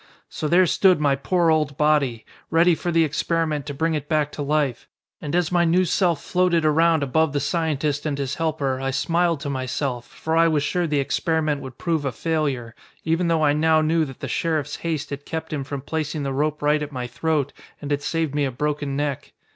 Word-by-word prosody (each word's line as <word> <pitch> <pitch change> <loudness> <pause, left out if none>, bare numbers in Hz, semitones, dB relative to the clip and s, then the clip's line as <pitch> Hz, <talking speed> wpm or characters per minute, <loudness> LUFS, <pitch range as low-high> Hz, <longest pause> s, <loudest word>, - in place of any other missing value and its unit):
"So 155 - -3
there 180 +4 +5
stood 185 0 +4
my 145 -2 +2
poor 170 +4 +1
old 150 -3 0
body. 145 -7 +1 0.2
Ready 170 +2 +4
for 175 +2 -2
the 165 -1 +4
experiment 155 -1 -1
to 145 - -4
bring 160 +3 0
it 150 -1 -4
back 150 -2 +1
to - - -6
life. 145 -4 -1 0.3
And 150 0 -3
as 175 -1 +1
my 175 -1 +3
new 175 +2 +3
self 175 -2 +1
floated 180 -3 +1
around 160 0 +3
above 155 +2 +1
the 145 - +1
scientist 150 -1 -1
and 145 -2 -2
his 140 -1 -2
helper 145 -5 -1
I 135 - -1
smiled 165 +3 +1
to 145 - -4
myself, 130 -1 -3
for 160 +5 -3
I 165 0 +5
was 155 -3 +1
sure 175 +3 0
the 150 -2 +1
experiment 155 +1 0
would 130 -2 -9
prove 165 -3 -1
a 135 - -1
failure, 140 -5 -2 0.3
even 165 +2 +1
though 165 -2 +2
I 145 - +4
now 155 +1 +3
knew 160 +1 +2
that 135 -3 -11
the - - -3
sheriff's 155 -3 -1
haste 155 -4 -3
had 140 0 -5
kept 160 +1 -5
him 145 -3 -2
from 140 0 -5
placing 155 +1 -3
the 135 -1 -2
rope 150 +2 -1
right 150 +1 +3
at 150 0 -4
my 125 -3 -4
throat 145 +3 -1 0.3
and 145 -1 -6
had 145 0 0
saved 160 0 -1
me 145 0 +1
a - - 0
broken 145 +1 -2
neck. 145 -2 -3
150 Hz, 220 wpm, -23 LUFS, 140-165 Hz, 0.3 s, there